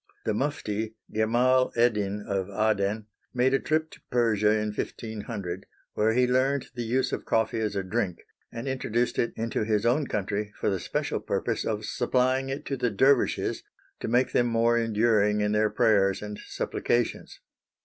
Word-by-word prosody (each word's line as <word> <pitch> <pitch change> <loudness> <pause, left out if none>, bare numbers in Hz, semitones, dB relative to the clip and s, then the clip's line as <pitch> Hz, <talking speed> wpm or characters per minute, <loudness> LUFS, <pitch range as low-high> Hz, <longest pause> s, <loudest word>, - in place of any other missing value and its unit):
The 110 - +1
mufti, 110 -4 -2 0.2
Gemal 125 +4 +3
Eddin 105 -3 +1
of 95 -1 -1
Aden, 105 0 0 0.3
made 130 +2 +3
a 135 - +4
trip 155 0 0
to - - -14
Persia 110 -4 +2
in 105 0 +1
1500, 105 -5 -5 0.3
where 110 +1 +2
he 125 +2 +4
learned 130 +2 +1
the 120 - -5
use 120 +3 0
of - - -3
coffee 110 0 +1
as 105 -2 -1
a 100 - -1
drink, 95 -3 -1 0.3
and 115 +3 -6
introduced 125 -2 -1
it 120 - +1
into 115 -1 -1
his 105 0 0
own 135 +4 +2
country 105 +1 -2
for - - +1
the 95 - -1
special - - -2
purpose - - -2
of 110 -1 -2
supplying 130 +3 +1
it 135 +2 -4
to 135 - -2
the 125 -1 +1
dervishes 130 +5 +2 0.4
to - - -4
make 125 +2 +2
them 120 - +2
more 115 0 +2
enduring 110 -2 +2
in 105 0 +1
their 105 0 +2
prayers 100 -3 +2
and 105 0 -6
supplications. 120 0 -2
110 Hz, 170 wpm, -27 LUFS, 105-125 Hz, 0.4 s, a